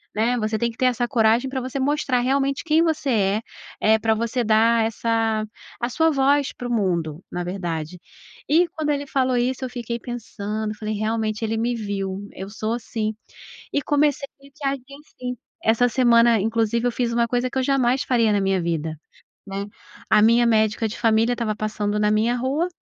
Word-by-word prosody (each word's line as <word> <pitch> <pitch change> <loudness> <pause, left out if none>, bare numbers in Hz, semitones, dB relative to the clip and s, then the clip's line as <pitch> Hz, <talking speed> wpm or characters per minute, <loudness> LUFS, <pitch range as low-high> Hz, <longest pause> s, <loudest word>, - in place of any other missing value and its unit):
né. 230 +3 +1
Você 215 0 -1
tem 235 +1 0
que 225 - -19
ter 255 - +1
essa 245 -1 +1
coragem 235 +1 +2
pra 265 - -3
você 260 +2 -4
mostrar 275 -2 +1
realmente 275 +2 0
quem 320 0 +4
você 315 -3 0
é, 205 -1 +2 0.4
eh, 220 +1 +5
pra 220 +1 +2
você 235 +3 -1
dar 225 +1 +4
essa 225 -1 0 0.3
a 240 - -1
sua 320 +5 +2
voz 280 0 +2
para 245 - -6
o - - -4
mundo, 175 -7 -1
na 180 - -3
verdade. 175 -2 -4 0.5
E 340 +4 +4
quando 315 -4 -3
ele 285 0 -1
falou 260 -2 +1
isso, 255 +2 -1
eu - - -5
fiquei 235 -1 -4
pensando, 215 -3 -4
falei: 215 0 -4
"Realmente, 215 +1 -1
ele 225 0 -1
me 240 +2 0
viu, 200 -2 -4
eu 195 +1 -7
sou 220 +1 -3
assim", 225 -2 -3 0.6
e 285 - 0
comecei 290 -1 +1 0.4
a 275 - +2
agir 275 -2 -5 0.2
assim. 250 -3 -6 0.3
Essa 230 +2 +3
semana, 235 -2 +4
inclusive, 225 +2 0
eu - - +1
fiz 235 -1 -1
uma 235 0 +2
coisa 245 +2 0
que 260 - -5
eu - - 0
jamais 265 0 +2
faria 230 -5 +2
na 205 - +2
minha 195 -1 +1
vida, 160 -2 -2 0.5
né. 195 +1 -4 0.4
A 210 - +5
minha 235 +2 +5
médica 220 -1 +2
de 215 - -7
família 225 +1 +3
estava 230 -3 -2
passando 210 -1 -2
na 210 0 +2
minha 220 +3 +2
rua 270 +7 0
230 Hz, 190 wpm, -23 LUFS, 215-255 Hz, 0.6 s, eh